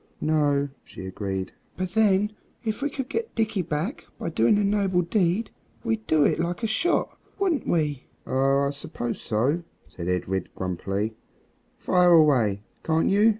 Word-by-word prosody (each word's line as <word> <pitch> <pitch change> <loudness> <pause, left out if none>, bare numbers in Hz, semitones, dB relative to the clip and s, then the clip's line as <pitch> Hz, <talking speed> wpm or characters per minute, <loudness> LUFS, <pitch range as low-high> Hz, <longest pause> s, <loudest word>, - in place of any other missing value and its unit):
"No," 145 -2 +2
she 95 - -9
agreed; 95 0 -3 0.3
"but 185 -1 -2
then 210 0 +3 0.3
if 220 +1 -2
we 290 - +1
could 270 -2 -4
get 455 - -3
Dickie 220 -3 +1
back 165 - -3
by 165 - -4
doing 120 - +4
a 205 - +2
noble 200 -3 +2
deed 185 +3 +1 0.3
we'd 225 -2 -2
do 155 -2 +4
it - - +2
like 175 +6 -2
a - - +3
shot, 325 +11 +1 0.2
wouldn't 375 -7 0
we?" 150 -5 0 0.2
"Oh! 135 +1 +2
I - - -1
suppose 120 -4 -5
so," 130 +10 +1 0.3
said 85 -1 -7
Edred 90 0 -1
grumpily; 95 +4 -2 0.6
"fire 180 -1 +4
away, 125 -11 +4 0.2
can't 160 +2 +2
you?" 205 +3 +5
165 Hz, 155 wpm, -26 LUFS, 125-210 Hz, 0.6 s, you